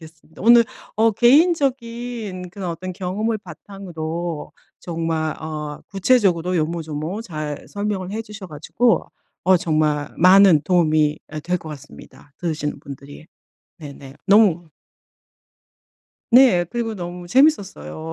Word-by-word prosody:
알겠습니다. 160 0 -15
오늘 235 +2 +7 0.3
어 225 0 +3
개인적인 240 - +1
그런 185 0 -6
어떤 175 +2 -5
경험을 200 +5 -2
바탕으로 170 -3 -6 0.3
정말 165 -2 -2
어 150 -1 -6
구체적으로 190 -4 +2
요모조모 160 +4 -3
잘 155 -7 -6
설명을 200 -2 -3
해 220 +2 -4
주셔 210 -3 -10
가지고 160 +11 0 0.4
어 185 +1 +5
정말 155 -3 0
많은 185 -3 +6
도움이 155 -4 +2
예 155 - -4
될 180 +4 -1
것 160 - -10
같습니다, 145 0 -13
들으시는 150 -4 -3
분들이. 140 +2 -11 0.5
네네. 140 -3 -11
너무 195 -5 +4 1.6
네. 240 -8 +6
그리고 230 -2 -3
너무 175 -2 -7
재미있었어요. 175 - +1
175 Hz, 275 characters per minute, -21 LUFS, 155-210 Hz, 1.6 s, 오늘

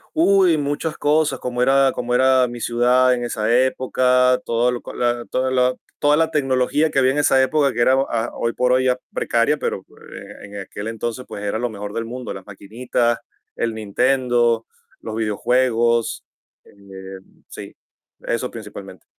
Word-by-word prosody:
Uy, 195 - +4
muchas 145 +2 -2
cosas, 145 -2 +1
como 125 0 -2
era 135 +1 +4
como 125 0 -3
era 130 0 +4
mi 120 0 -8
ciudad 125 +2 +3
en 120 - -4
esa 110 -2 -2
época, 125 0 +2
todo 120 +1 +1
lo 125 - -3
co - - -9
la 120 -1 -1
toda 130 0 -1
la 125 0 +2 0.2
toda 145 0 +3
la 165 0 +2
tecnología 145 +1 +1
que - - +1
había 130 -1 +4
en - - -3
esa 135 -2 +3
época 140 0 +2
que - - -1
era 130 +2 +4
oh, 135 - +1
ah, 115 0 -1
hoy 115 0 -2
por 125 0 +1
hoy 130 0 +2
ya 125 0 +1
precaria, 120 +6 +1
pero 145 - -3
oh, - - -21 0.2
eh, - - -11
en 100 +1 -12
aquel 100 +2 -7
entonces, 115 +2 -4
pues 100 - -8
era 105 +1 -2
lo 120 +2 -2
mejor 105 -1 -7
del 115 +1 -3
mundo, 125 +1 -6
las 95 -1 -8
maquinitas, 115 +4 -2 0.4
el 115 -1 -2
Nintendo, 120 +2 +1 0.3
los 110 - -6
videojuegos, 115 +1 +1 0.4
eh - - -21 0.7
sí, - - -10 0.4
eso 115 +2 -3
principalmente. 100 -4 -10
125 Hz, 180 wpm, -20 LUFS, 115-130 Hz, 0.7 s, Uy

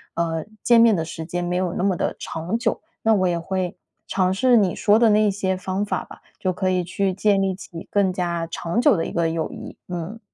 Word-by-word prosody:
呃， 165 -1 -1 0.2
见 235 -1 +6
面 230 -2 +6
的 165 -3 -1
时 160 0 -6
间 175 +1 -3
没 175 0 -1
有 180 -1 0
那 - - -2
么 195 -2 +2
地 - - -2
长 165 +7 -3
久。 235 -1 -1 0.2
那 225 - +4
我 185 -3 +2
也 170 -1 0
会 185 +1 -3 0.3
尝 185 -1 +1
试 245 +5 +4
你 195 -5 +2
说 210 +1 +4
的 230 -1 +5
那 210 +1 +4
一 205 - +3
些 190 -1 -1
方 190 +2 -2
法 - - -2
吧， - - -14 0.2
就 185 - 0
可 185 +1 -1
以 185 -1 +1
去 190 +2 -1
建 200 +1 +2
立 190 -1 0
起 170 -3 -10
更 200 -2 +2
加 175 -2 -2
长 170 +6 -2
久 255 -6 +5
的 165 - -1
一 - - -5
个 170 -1 +1
友 160 -1 -2
谊。 - - -9
嗯。 180 +5 -5
185 Hz, 260 characters per minute, -23 LUFS, 170-205 Hz, 0.3 s, 见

